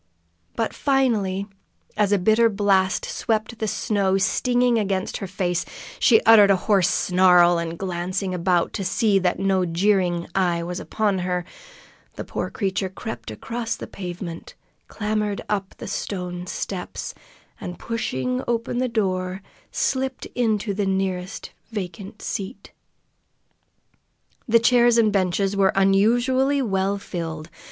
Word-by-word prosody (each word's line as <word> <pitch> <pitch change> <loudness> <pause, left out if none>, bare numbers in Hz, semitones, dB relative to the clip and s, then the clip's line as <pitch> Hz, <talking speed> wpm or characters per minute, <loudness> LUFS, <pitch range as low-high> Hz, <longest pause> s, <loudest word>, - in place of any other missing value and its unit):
But 225 - -1
finally, 220 -9 +1 0.5
as 210 -1 +2
a 205 - +4
bitter 220 +5 +4
blast 195 -2 +2
swept 220 0 -2
the 220 - -1
snow 195 -2 +1
stingingly 245 +3 +2
against 195 -2 -2
her 195 - -5
face, 180 -1 -1 0.4
she 225 -4 +6
uttered 215 -3 +7
a 195 - +6
hoarse 190 -1 +2
snarl, 180 -1 +4
and 170 0 -4
glancing 185 +1 -3
about 175 -1 +1
to 200 - -3
see 195 +1 +2
that 180 -1 0
no 190 -1 +1
jeering 175 0 +1
eye 175 -3 +1
was 175 +1 -4
upon 205 -3 -1
her, 180 -1 -2 0.7
the - - -5
poor - - -4
creature 190 -1 -2
crept 120 -11 -7
across 225 - -4
the - - -7
pavement, 175 -2 -7 0.3
clambered 210 -1 -2
up 200 -2 -2
the - - -8
stone 180 -2 -4
steps, 185 0 -5 0.5
and, 180 -3 -6
pushing 130 - -2
open 235 +1 -1
the 255 0 0
door, 190 -3 -1 0.3
slipped 265 -1 -1
into 220 -4 0
the 200 0 -1
nearest 190 +1 -2 0.2
vacant 200 0 -6
seat. 200 +5 -5 1.8
The 230 0 +5
chairs 240 0 +4
and 215 -3 +3
benches 195 +1 +1
were 195 0 +3
unusually 240 +8 +3
well 200 -5 0
filled. 165 -4 -6
195 Hz, 130 wpm, -23 LUFS, 180-220 Hz, 1.8 s, uttered